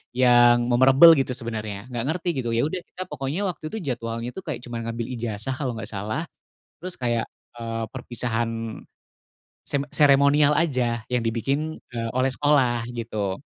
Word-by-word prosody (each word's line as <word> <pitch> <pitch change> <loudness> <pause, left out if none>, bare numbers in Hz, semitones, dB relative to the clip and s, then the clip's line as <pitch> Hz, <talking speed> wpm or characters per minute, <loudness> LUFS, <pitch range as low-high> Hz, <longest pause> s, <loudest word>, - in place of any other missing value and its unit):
yang 120 -1 +5
memorable, 135 +7 +7
gitu, 135 -2 0
sebenernya 110 -3 -5
nggak 120 -1 -2
ngerti, 175 +2 -1
gitu, 120 - -2
ya, 115 - +2
udah, 180 +3 -3
kita 185 - -9
pokoknya 145 +6 -3
waktu 180 -4 -5
itu 220 - -4
jadwalnya, 115 0 -4
tuh, 190 - -5
kayak - - -4
cuma 120 -1 -5
ngambil 115 0 -3
ijazah 115 +2 -3
kalau 130 -2 -2
nggak 115 - -5
salah, 110 +10 -3 0.6
terus 180 0 -3
kayak, 120 -2 0 0.3
eee, 115 -1 -4
perpisahan 115 -2 -3 0.9
sem 140 -2 -1
seremonial 145 +1 +5
aja 125 -8 0
yang 125 -1 +1
dibikin, 135 +7 -1 0.2
eee, 115 -1 -2
oleh 130 0 +2
sekolah, 130 -5 +2
gitu, 110 -5 -3
120 Hz, 155 wpm, -24 LUFS, 115-140 Hz, 0.9 s, memorable